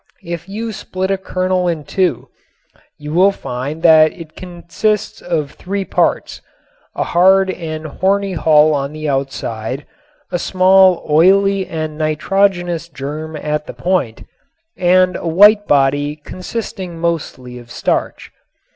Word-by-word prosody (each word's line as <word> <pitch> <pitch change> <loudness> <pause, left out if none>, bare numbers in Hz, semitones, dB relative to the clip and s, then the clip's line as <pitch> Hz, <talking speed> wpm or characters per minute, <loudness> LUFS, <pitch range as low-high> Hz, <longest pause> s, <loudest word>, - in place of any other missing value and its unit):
If 170 +2 -6
you 220 +3 -4
split 190 -2 -4
a 195 - +1
kernel 185 -1 -1
in 165 -3 -2
two 185 +3 -1 0.7
you 150 +1 -7
will 190 +4 +5
find 140 -1 -6
that 155 -2 +6
it 165 -3 -12
consists 185 +4 -3
of 155 -5 -2
three 195 +1 -4
parts: - - -1 0.5
a - - 0
hard 190 +2 +3
and 155 -3 -6
horny 195 +5 0
hull 155 -2 +4
on 140 0 -2
the 155 0 -5
outside, 135 -2 -3 0.5
a 175 - -1
small 185 0 +4
oily 190 +5 +3
and 155 -1 -5
nitrogenous 175 +2 0
germ 155 +2 -6
at 150 0 -3
the - - -7
point, 175 -12 -2 0.5
and 185 0 +3
a - - -4
white 205 +5 +5
body 145 +1 +2
consisting 185 +2 -7
mostly 145 -7 -4
of 120 -1 -15
starch. - - -2
170 Hz, 130 wpm, -17 LUFS, 150-190 Hz, 0.7 s, that